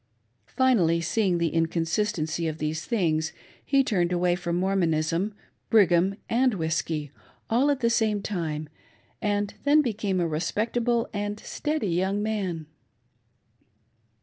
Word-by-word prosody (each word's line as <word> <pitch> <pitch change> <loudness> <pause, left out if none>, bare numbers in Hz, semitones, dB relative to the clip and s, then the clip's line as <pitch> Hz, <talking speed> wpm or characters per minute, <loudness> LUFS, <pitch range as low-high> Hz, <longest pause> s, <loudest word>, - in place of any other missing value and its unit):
Finally, 210 -11 +3
seeing 180 +2 +1
the 170 -1 +1
inconsistency 165 0 0
of 155 -1 -3
these 155 +1 -3
things, 160 -8 0 0.3
he 275 -1 +3
turned 180 -8 +1
away 175 0 +2
from 170 -1 -3
Mormonism, 175 0 +1 0.4
Brigham, 190 -3 +4
and 250 0 +2
whiskey, 160 -3 -2 0.4
all 255 +6 +3
at 280 -2 0
the 235 - +3
same 220 -3 +2
time, 160 -7 -3 0.5
and 205 -1 0
then 300 +1 +5
became 210 -6 -1
a 170 - +1
respectable 230 +9 0
and 205 0 -3
steady 300 -9 -2
young 190 +4 0
man. 190 -7 -2
190 Hz, 120 wpm, -26 LUFS, 165-220 Hz, 0.5 s, then